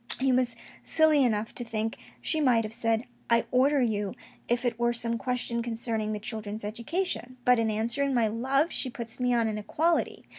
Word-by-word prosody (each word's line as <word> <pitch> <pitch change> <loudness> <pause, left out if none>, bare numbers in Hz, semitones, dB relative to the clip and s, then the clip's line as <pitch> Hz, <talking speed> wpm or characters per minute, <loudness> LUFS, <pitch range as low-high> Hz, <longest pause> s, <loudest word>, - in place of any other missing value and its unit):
He 265 0 +2
was 250 -2 +1 0.3
silly 315 -3 +4
enough 220 -3 0
to 245 - -3
think 225 -1 -2 0.3
she 315 - 0
might 245 -5 +4
have 215 0 -6
said 225 0 0
" - - -34
I 235 0 +3
order 270 +2 +4
you," 210 -4 -1 0.3
if 240 +1 0
it 235 -1 -1
were 240 0 +2
some 235 -1 -1
question 250 -2 -1
concerning 225 -2 -2
the 210 - -3
children's 215 -1 -5
education, 255 - -3
but 250 -1 +5
in 225 -1 +1
answering 235 +6 0
my 235 -2 +3
love 265 +8 +1
she 260 - -1
puts 235 -2 -5
me 250 0 +1
on 235 -2 +2
an 215 -1 -2
equality. 325 +10 0
235 Hz, 195 wpm, -28 LUFS, 225-255 Hz, 0.3 s, but